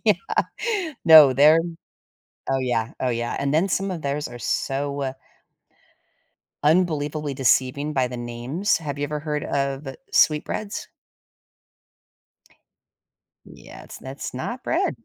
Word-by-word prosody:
Yeah. -, -, +5 dB, 0.9 s
No, 155 Hz, -5 st, +9 dB
they're 155 Hz, +4 st, +6 dB, 0.9 s
Oh 135 Hz, -, +2 dB
yeah, 120 Hz, -3 st, -1 dB
oh 130 Hz, -, 0 dB
yeah, 120 Hz, 0 st, -2 dB
and 140 Hz, +1 st, -1 dB
then 170 Hz, +5 st, +2 dB
some 195 Hz, +2 st, -1 dB
of 170 Hz, -, -5 dB
theirs 140 Hz, +1 st, -2 dB
are 120 Hz, 0 st, -10 dB
so, 140 Hz, +4 st, -2 dB
uh 135 Hz, -1 st, -2 dB, 1.5 s
unbelievably 150 Hz, -3 st, +1 dB
deceiving 130 Hz, +4 st, +1 dB
by 130 Hz, -3 st, +1 dB
the 125 Hz, -, -7 dB
names. 120 Hz, -, -1 dB
Have 145 Hz, -3 st, -5 dB
you 145 Hz, -, -1 dB
ever 150 Hz, +1 st, -3 dB
heard 150 Hz, -1 st, -3 dB
of 140 Hz, 0 st, -2 dB, 0.2 s
sweet 150 Hz, -1 st, +4 dB
breads? 210 Hz, 0 st, -5 dB, 2.6 s
Yeah, -, -, -13 dB
it's -, -, -11 dB
that's -, -, -7 dB
not -, -, -5 dB
bread. -, -, 0 dB
145 Hz, 130 wpm, -23 LUFS, 130-155 Hz, 2.6 s, No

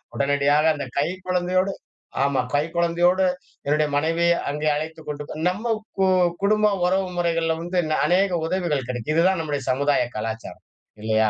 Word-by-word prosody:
உடனடியாக 145 Hz, +2 st, +2 dB
அந்த 145 Hz, -, -4 dB
கை 145 Hz, -, +2 dB, 0.2 s
குழந்தையோடு 185 Hz, +1 st, +1 dB, 0.5 s
ஆமா. 140 Hz, -1 st, +1 dB
கை 145 Hz, +1 st, +3 dB
குழந்தையோடு 175 Hz, +2 st, +2 dB, 0.4 s
என்னுடைய 150 Hz, +2 st, +2 dB
மனைவி 165 Hz, +3 st, +1 dB, 0.2 s
அங்கே 150 Hz, +2 st, -2 dB
அழைத்துக் 160 Hz, +1 st, -5 dB
கொண்டு 150 Hz, 0 st, -6 dB
நம்ம 205 Hz, +6 st, -2 dB, 0.3 s
போ 190 Hz, -, +3 dB, 0.4 s
குடும்ப 210 Hz, +1 st, +3 dB
உறவு 190 Hz, +1 st, +2 dB
முறைகள்ல 165 Hz, -1 st, +1 dB
வந்து 175 Hz, +2 st, -4 dB
ந -, -, +1 dB
அநேக 190 Hz, +2 st, +3 dB
உதவிகள் 165 Hz, -5 st, -1 dB
கிடைக்கும். 120 Hz, +3 st, -3 dB
இதுதான் 185 Hz, +2 st, +3 dB
நம்முடைய 145 Hz, -3 st, -3 dB
சமுதாய 140 Hz, 0 st, +2 dB
கலாச்சாரம் 110 Hz, +1 st, -5 dB, 0.4 s
இல்லையா? 110 Hz, 0 st, +2 dB
160 Hz, 145 wpm, -23 LUFS, 145-180 Hz, 0.5 s, கை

